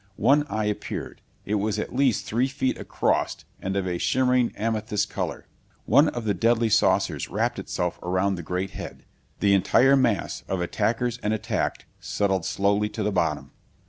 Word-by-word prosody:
One 145 +2 +3
eye 110 0 -1
appeared. 105 -1 -4 0.2
It 105 +1 0
was 110 0 -1
at 105 - -4
least 135 -3 +2
three 120 +4 +1
feet 135 -1 -1
across - - -1 0.2
and 95 +1 -3
of 100 -1 0
a 90 -1 -2
shimmering 125 -1 +2
amethyst 110 -1 -1
color. - - -4 0.4
One 150 - +5
of 120 -5 -3
the 105 - +2
deadly 115 +4 +2
saucers 110 +1 +2
wrapped - - -1
itself - - -3
around 95 +2 0
the 90 - -4
great 90 +3 -3
head. - - -8 0.4
The 100 -1 +4
entire 130 +8 +5
mass 120 -6 0
of 95 - -2
attackers 115 +6 -1
and 105 +1 0
attacked 110 - -2
settled 95 -4 -1
slowly 100 +1 +1
to 110 - -4
the 105 - 0
bottom. 80 -5 -1
105 Hz, 170 wpm, -25 LUFS, 100-120 Hz, 0.4 s, One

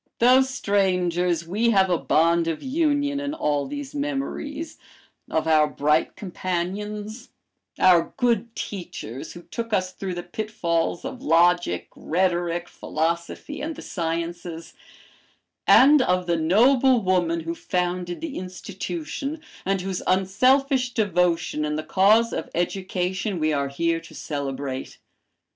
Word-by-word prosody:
"Though 255 +3 +6
strangers, 180 -8 +1
we 215 +7 +1
have 190 -4 +3
a 175 - +3
bond 165 +1 +2
of 165 -2 -3
union 285 0 +1
in 285 +1 -3
all 145 - 0
these 285 -1 -6
memories, 290 +2 -4 0.5
of 160 0 0
our 155 -1 +5
bright 150 +2 +1
companions, 205 +5 -4 0.5
our 175 -3 +4
good 235 -3 +1
teachers, 155 - -6
who 175 - -11
took 230 +2 -5
us 185 -2 0
through 190 -2 -5
the 175 - -5
pitfalls 175 -5 -2
of 255 - -6
logic, 175 - +3
rhetoric, 175 0 0
philosophy, 170 - -3
and 315 +2 -4
the - - -9
sciences, 170 0 -4 0.9
and 285 +2 +7
of 180 -6 +1
the 170 -1 +1
noble 240 +10 +4
woman 175 -3 +1
who 165 +1 -3
founded 180 0 -2
the 325 -4 -4
institution, 185 - -5 0.3
and 195 -1 +1
whose 190 -1 -3
unselfish 255 +7 +2
devotion 180 -7 +1
in 150 0 -1
the 155 - -3
cause 215 +7 +4
of 160 - -4
education 185 +2 -2
we 155 0 +1
are 140 -1 0
here 165 +4 0
to 165 - -14
celebrate. 135 -2 -4
185 Hz, 130 wpm, -24 LUFS, 170-235 Hz, 0.9 s, and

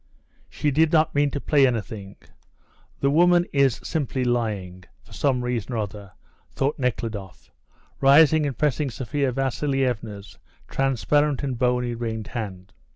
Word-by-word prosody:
"She 145 - -1
did 160 +3 +3
not 160 -1 +3
mean 145 0 +2
to 140 - -4
play 140 -1 +3
anything; 100 -4 -4 0.9
the 140 - +2
woman 175 +2 +4
is 140 -4 +3
simply 135 -4 -2
lying, 105 -7 -2 0.2
for - - -17
some 125 +2 0
reason 125 -1 -3
or - - -2
other," 100 -2 -5 0.4
thought 140 +2 -2
Nekhludoff, 110 -7 -4 0.5
rising 150 +2 +5
and 135 -5 -5
pressing 150 -1 0
Sophia 135 +3 -2
Vasilievna's 125 -6 -2 0.3
transparent 135 +2 +1
and 135 -3 -2
bony, 125 0 0
ringed 115 -2 -4
hand. 100 -5 -6
125 Hz, 135 wpm, -24 LUFS, 110-145 Hz, 0.9 s, rising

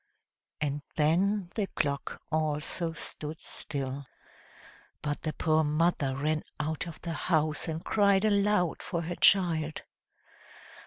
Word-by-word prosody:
and 145 -1 -1
then 180 +5 +2
the 210 -3 0
clock 140 -1 -2
also 155 +2 -1
stood 155 -1 -7
still. 140 -1 -5 1.0
But 145 0 -2
the 155 - -2
poor 155 +1 +2
mother 150 -3 +1
ran 155 +3 0 0.2
out 155 +3 -2
of 165 - -8
the 170 -1 -3
house 155 -1 +1
and 160 +1 -4
cried 200 -1 +4
aloud 205 -4 +2
for 170 -2 -2
her 175 +2 -3
child. 165 -6 +3
160 Hz, 120 wpm, -30 LUFS, 150-180 Hz, 1.0 s, cried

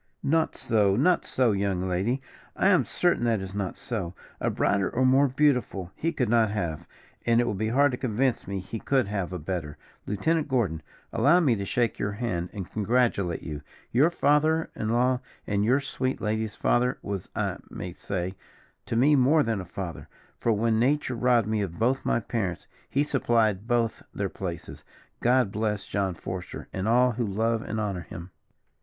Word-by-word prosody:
"Not 160 +3 +1
so, 105 -4 +2
not 180 - +3
so, 125 -3 +2
young 95 -2 0
lady. 105 +9 0 0.3
I - - +3
am - - +4
certain 175 -8 +1
that 115 -3 +2
it - - -5
is 95 0 -7
not 100 -3 -3
so. 95 -7 -4 0.2
A - - 0
brighter 100 -1 +1
or 130 +2 +1
more 135 +2 +5
beautiful, 125 -9 +1
he 165 - -1
could 135 -6 0
not 115 -1 +3
have, 85 -7 -3 0.4
and 115 0 +3
it - - +4
will 120 - -1
be 110 +3 -1
hard 140 +5 +4
to 125 - -4
convince 125 +1 0
me 100 -1 -3
he 110 +4 -6
could 130 0 +1
have 100 -3 -2
a 90 - -3
better, 80 -3 -4 0.3
Lieutenant 155 +10 0
Gordon, 110 - 0 0.3
allow 165 +6 +5
me 145 -9 +3
to 100 -2 -3
shake 120 +2 0
your 100 0 -1
hand, 100 -6 -2
and 95 -4 -7
congratulate 110 -5 +1
you; 75 -3 -5 0.3
your 140 +7 +4
father 155 0 +2
in 110 - -2
law, 125 +2 +2 0.3
and 100 0 0
your 125 +6 +3
sweet 130 -1 -2
lady's 110 0 -2
father, 125 +1 +1
was, 100 -3 -4
I - - -1
may 90 -1 -6
say, 90 0 -3 0.5
to - - -2
me 140 +6 +5
more 145 +4 +4
than 115 -4 -1
a - - -8
father; 85 -1 -6 0.3
for, 115 - +1
when 110 +1 +2
Nature 135 +2 +1
robbed 120 -2 +3
me 110 -1 0
of 90 -4 -4
both 125 +4 +1
my - - +1
parents, 105 -6 -3 0.2
he 140 - +2
supplied 115 -7 +1
both 120 -2 +1
their 100 -1 -1
places. 85 -1 -6 0.4
God 125 -4 +3
bless 105 -1 -1
John 95 -3 -1
Forester, 90 +2 -6
and 95 +2 -2
all 125 +2 +4
who 120 +1 -2
love 115 +2 0
and 110 - -4
honour 100 -4 -2
him." 85 +1 -9
110 Hz, 190 wpm, -27 LUFS, 95-125 Hz, 0.5 s, more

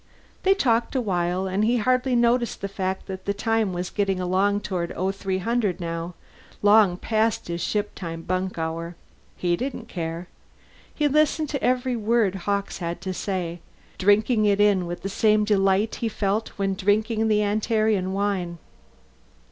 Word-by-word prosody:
They 385 +1 +4
talked 235 -7 +1
a - - +3
while, 180 -4 0
and 190 +2 0
he 235 +3 +3
hardly 255 +2 +1
noticed 235 0 +2
the 200 - -2
fact 190 -1 -3
that 190 -1 -7
the 200 - -1
time 225 -1 0
was 180 0 -4
getting 195 -2 0
along 195 +3 +1
toward 175 -4 -3
0300 195 +2 -1
now, 170 0 -4 0.5
long 205 -3 +5
past 220 +2 0
his 170 0 -3
shiptime 170 -5 -3
bunk 185 0 -2
hour. 165 +1 -3 0.4
He 175 -1 +1
didn't 245 +1 -5
care. 170 0 -4 0.6
He 295 - +1
listened 305 +1 +2
to 280 - -3
every 255 0 +1
word 225 -3 +2
Hawkes 200 +1 -2
had 170 -1 -3
to 190 -1 -3
say, 175 -3 -3 0.4
drinking 215 +3 +3
it 205 -1 +3
in 200 -4 +3
with 175 0 -6
the - - -2
same 210 +2 +3
delight 195 +1 +2
he 230 - 0
felt 210 +1 -1
when 195 -1 0
drinking 215 +3 +1
the 210 -1 +3
Antarean 215 -2 +1
wine. 190 -3 -1
200 Hz, 155 wpm, -24 LUFS, 185-220 Hz, 0.6 s, long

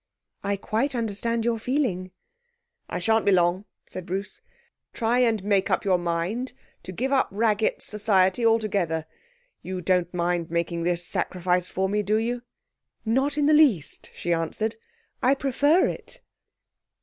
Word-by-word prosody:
'I 200 0 0
quite 255 +7 -1
understand 230 0 -1
your 235 -1 +1
feeling.' 220 -8 -1 0.8
'I - - -3
shan't 225 -1 +2
be 200 - +3
long,' 180 +1 +2 0.2
said 185 -1 -8
Bruce. 195 +3 -4 0.5
'Try 235 +2 +1
and 225 -5 +2
make 200 -1 +2
up - - 0
your 185 -2 +3
mind 175 +9 -2 0.3
to 180 - -8
give 260 +9 -2
up 265 - +3
Raggett's 215 +1 +1
society 205 0 +2
altogether. 200 -8 +1 0.6
You 185 0 -5
don't 180 0 +1
mind 175 -1 -1
making 170 0 -1
this 175 0 0
sacrifice 180 0 -1
for 190 +1 -1
me, 210 +2 0
do 205 +1 0
you?' 240 +2 -1 0.6
'Not 265 +6 +1
in 295 - +2
the 305 - +5
least,' 275 - +3
she 175 - -1
answered. 190 +7 -2 0.5
'I 265 +2 +4
prefer 285 +6 +3
it.' - - -7
205 Hz, 150 wpm, -25 LUFS, 180-235 Hz, 0.8 s, the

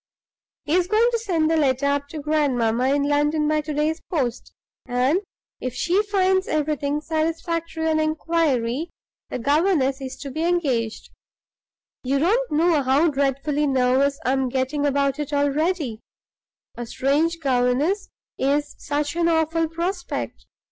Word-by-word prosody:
He 295 - -1
is 360 0 +3
going 435 +4 +3
to 465 - 0
send 345 -8 0
the 325 0 +2
letter 275 -2 +1
up 285 0 0
to 310 - -8
grandmamma 260 -5 +1
in 285 - +1
London 295 +1 +1
by 305 0 +2
to 300 +1 -6
day's 305 +2 0
post, 255 -8 -2 0.4
and, 255 +7 +2 0.4
if 255 -1 -4
she 355 +9 +2
finds 380 -2 +1
everything 295 -1 -1
satisfactory 325 +1 -2
on 315 -1 +2
inquiry, 310 -3 0 0.4
the - - -3
governess 285 0 +1
is 260 -1 -5
to 275 -1 -6
be 315 +4 -3
engaged 275 -11 -1 0.9
You 270 +2 +1
don't 440 - +1
know 320 0 +3
how 280 +5 +3
dreadfully 280 +2 0
nervous 265 +1 +2
I 255 - +2
am 265 -1 +1
getting 270 +3 0
about 280 0 +1
it 295 0 -4
already; 285 -3 0 0.8
a 240 0 -6
strange 295 +7 +1
governess 275 +8 +1 0.3
is 290 +2 0
such 290 +1 -2
an 340 -1 +2
awful 325 0 +1
prospect. 350 +3 -4
295 Hz, 145 wpm, -23 LUFS, 270-330 Hz, 0.9 s, is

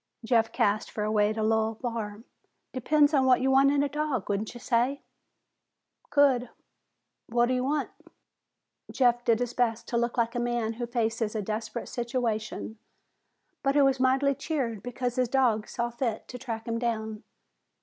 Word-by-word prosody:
Jeff 225 -1 +2
cast 205 +1 +1
for 210 - -4
a 215 - -1
way 210 -1 +3
to 220 0 -2
lull 220 0 +1
Barr. 225 -3 -5 0.5
"Depends 290 +4 +3
on 270 -3 +4
what 255 -1 +5
you 265 +1 +1
want 270 +1 +5
in 285 0 +2
a - - +1
dog, 290 -7 -2
wouldn't 205 +3 -2
you - - -8
say?" 250 +3 0 1.1
"Could. 270 -4 +3 0.8
What 240 +1 +2
do 255 - 0
you 250 0 0
want?" 290 +3 -1 1.0
Jeff 245 -2 +2
did 230 -2 +3
his 245 -1 -2
best 235 -2 0
to 235 - 0
look 235 +1 -1
like 230 -1 +1
a 245 - -2
man 240 -2 -1
who 240 +1 -4
faces 225 -2 -1
a 215 - 0
desperate 220 +3 -4
situation, 230 -3 -3 0.8
but 275 0 +1
who 285 -1 +6
was 270 -1 +2
mightily 265 +2 +3
cheered 255 -7 -3
because 245 0 -3
his 250 -2 +1
dog 235 -5 +2
saw 235 0 -3
fit 235 -2 -3
to 250 - -7
track 225 -2 -5
him 230 0 -1
down. 220 -2 -2
240 Hz, 175 wpm, -28 LUFS, 225-260 Hz, 1.1 s, who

